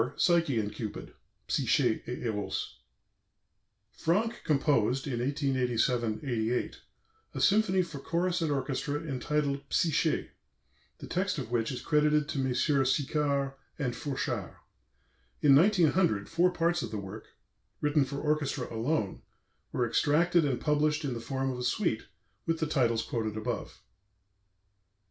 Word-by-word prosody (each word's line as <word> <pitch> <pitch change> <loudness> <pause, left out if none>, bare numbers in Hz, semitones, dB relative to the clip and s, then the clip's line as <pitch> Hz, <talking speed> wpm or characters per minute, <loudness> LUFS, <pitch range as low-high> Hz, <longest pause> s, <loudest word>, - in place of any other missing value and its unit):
PSYCHE 170 -7 +3
AND 105 -1 -1
CUPID 105 -1 -6 0.3
(Psyché 120 -2 +2
et 125 - -3
Eros) 105 -4 -3 1.1
Franck 215 +8 0
composed 135 -4 +2
in 125 -5 -2
1887 125 -4 0
88 120 -3 -1 0.5
a - - -2
symphony 195 -3 +3
for 165 -5 -8
chorus 175 +4 0
and 160 -2 0
orchestra 140 +1 -1
entitled 140 -1 -1
"Psyché," 165 -1 +1 0.7
the - - -9
text 185 0 -1
of 125 -5 -5
which 115 0 0
is 125 - -5
credited 150 0 +3
to 150 - -3
Messrs. 135 +1 +2
Sicard 140 -1 0 0.2
and 130 -4 -1
Fourchard. 140 -3 -3 0.9
In 140 - +7
1900 170 - +3
four 170 +2 +3
parts 170 0 +1
of - - -4
the 110 - -4
work, 100 +2 -7 0.5
written 150 -1 +3
for 140 +1 -5
orchestra 150 -5 -1
alone, 115 -3 -1 0.5
were 120 - 0
extracted 165 +7 +3
and 135 -4 0
published 150 0 +1
in 135 - -1
the 115 - -5
form 135 +1 -2
of 125 - -5
a - - -3
suite, 125 - 0 0.4
with 165 0 +1
the 160 - 0
titles 120 -7 +1
quoted 110 -2 -3
above. 115 +2 -4
140 Hz, 135 wpm, -30 LUFS, 125-160 Hz, 1.1 s, In